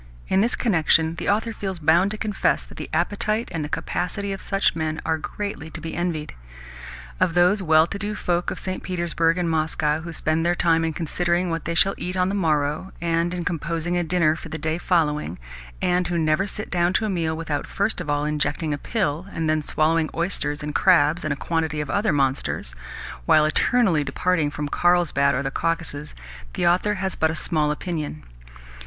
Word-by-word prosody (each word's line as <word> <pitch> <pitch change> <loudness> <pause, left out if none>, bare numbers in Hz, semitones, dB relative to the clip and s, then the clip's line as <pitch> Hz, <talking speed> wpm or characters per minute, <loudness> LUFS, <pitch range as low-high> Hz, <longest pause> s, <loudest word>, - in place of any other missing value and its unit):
In 190 - +3
this 235 +3 +1
connection 165 -6 +3
the 170 - -3
author 220 +3 +1
feels 195 -3 -4
bound 165 +4 +4
to 215 - -5
confess 210 -2 0
that - - -14
the - - -6
appetite 215 +3 0
and 165 -4 -2
the 150 - -5
capacity 200 +5 -2
of 195 - -7
such 195 -3 +1
men 160 -1 -2
are 160 -1 0
greatly 200 -2 -5
to - - -8
be 165 - -6
envied. 165 -3 -2 0.9
Of 165 - +2
those 180 +4 +4
well 160 -2 +5
to 200 +4 -6
do 210 +1 -3
folk 175 -3 0
of - - -5
St. 185 0 -4
Petersburg 170 -2 0
and 175 -1 0
Moscow 155 -1 0
who 170 +1 -7
spend 160 0 0
their 175 +1 +2
time 165 -1 +2
in 160 -1 -1
considering 175 +2 0
what 165 -1 -3
they 170 - -2
shall 195 +3 +4
eat 180 +1 -3
on 180 0 +2
the - - -2
morrow, 155 -1 0
and 170 0 0
in 175 -1 -4
composing 170 +1 -2
a 175 - +1
dinner 165 -2 +2
for - - -9
the 160 - -4
day 155 +2 -2
following, 150 - 0 0.5
and 180 0 +2
who 175 - -1
never 160 +4 +2
sit 210 +1 -6
down 175 0 +2
to 220 - +1
a - - 0
meal 165 -4 -1
without 155 -3 -3
first 200 +2 -1
of - - -6
all 145 0 +1
injecting 150 +1 -1
a 145 - -4
pill 180 -5 -2
and 165 -1 -2
then 155 0 +2
swallowing 155 +1 +1
oysters 155 -4 -2
and 150 0 -4
crabs 170 -2 +4
and 155 - -1
a 145 - -1
quantity 160 -2 -1
of 150 - -3
other 205 0 +1
monsters, 135 - -1 0.5
while 155 -1 +6
eternally 175 - +2
departing 165 0 0
for 150 0 -4
Karlsbad 150 -4 +2
or 140 - -1
the 135 - -2
Caucasus, 160 -2 -2 0.4
the - - -1
author 185 +4 +3
has 190 -1 -2
but 160 - +1
a 160 - -2
small 155 -1 +1
opinion. 150 - -4
165 Hz, 205 wpm, -23 LUFS, 155-180 Hz, 0.9 s, while